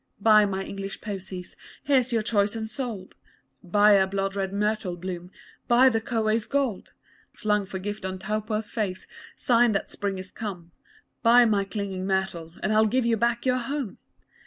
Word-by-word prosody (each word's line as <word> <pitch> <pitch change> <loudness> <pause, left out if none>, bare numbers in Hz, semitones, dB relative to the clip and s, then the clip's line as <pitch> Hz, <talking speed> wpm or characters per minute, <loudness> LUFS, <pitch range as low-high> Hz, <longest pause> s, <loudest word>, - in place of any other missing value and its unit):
Buy 215 0 +6
my 195 -1 -2
English 195 0 -6
posies! 190 -3 -7 0.3
Here's 260 -3 +2
your 225 -2 +1
choice 205 -1 +1
unsold! 220 -3 -5 0.5
Buy 205 +4 +4
a 195 -2 +5
blood 195 0 -2
red 195 -1 -2
myrtle 210 -2 -1
bloom, 180 0 -6 0.4
Buy 250 +2 +6
the 225 -2 0
kowhai's 220 -1 0
gold 275 -8 -1 0.4
Flung 210 -2 0
for 190 - -5
gift 205 +2 -5
on 190 0 -3
Taupo's 215 +2 -2
face, 195 -5 -3 0.3
Sign 240 -2 +3
that 195 - -2
spring 200 -1 -3
is 185 +1 -7
come 180 -6 -7 0.5
Buy 240 +1 +6
my 205 -3 +2
clinging 195 -1 -4
myrtle 185 -4 -2
And 215 - +1
I'll 220 0 +4
give 250 +3 +1
you 235 -1 +3
back 235 +2 0
your 255 0 +2
home! 260 -2 -4
210 Hz, 165 wpm, -26 LUFS, 190-230 Hz, 0.5 s, Buy